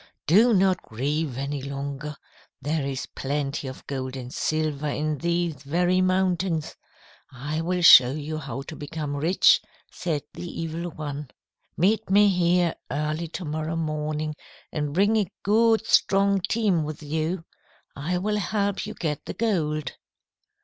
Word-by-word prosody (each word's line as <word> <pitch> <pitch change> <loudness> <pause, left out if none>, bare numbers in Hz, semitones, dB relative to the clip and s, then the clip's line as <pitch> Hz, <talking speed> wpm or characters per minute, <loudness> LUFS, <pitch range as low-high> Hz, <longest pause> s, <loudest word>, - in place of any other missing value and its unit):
"'Do 215 +10 +5
not 190 -3 +3
grieve 140 +4 -2
any 140 +1 -3
longer. 140 +2 -5 0.4
There 145 +2 -1
is 135 -2 -3
plenty 140 0 -3
of 130 - -9
gold 130 -1 -4
and 125 -1 -7
silver 155 -2 -1
in 150 0 -1
these 170 -4 -1
very 175 +6 +1
mountains. 185 -3 +1 0.6
I 145 +5 -3
will 180 +1 -1
show 130 -6 +9
you 155 +2 -4
how 135 -2 -5
to 155 - -8
become 145 -1 -5
rich,' 160 +6 +4 0.3
said 160 -5 -2
the 175 - -7
Evil 165 +2 -4
One. 150 -3 -6 0.5
'Meet 205 +5 +2
me 205 +1 +6
here 175 -2 +2 0.2
early 150 +4 -2
to 170 +2 -6
morrow 155 +2 -3
morning 155 -1 -2 0.4
and 150 -2 -2
bring 205 +4 +4
a 205 -5 0
good 225 +2 +3
strong 195 -2 +3
team 205 -8 +2
with 155 0 -6
you. 160 +3 -2 0.5
I 165 +6 -2
will 210 +3 0
help 205 0 -1
you 215 - -6
get 150 -4 -3
the - - -5
gold.' 155 - -1
155 Hz, 145 wpm, -25 LUFS, 145-185 Hz, 0.6 s, show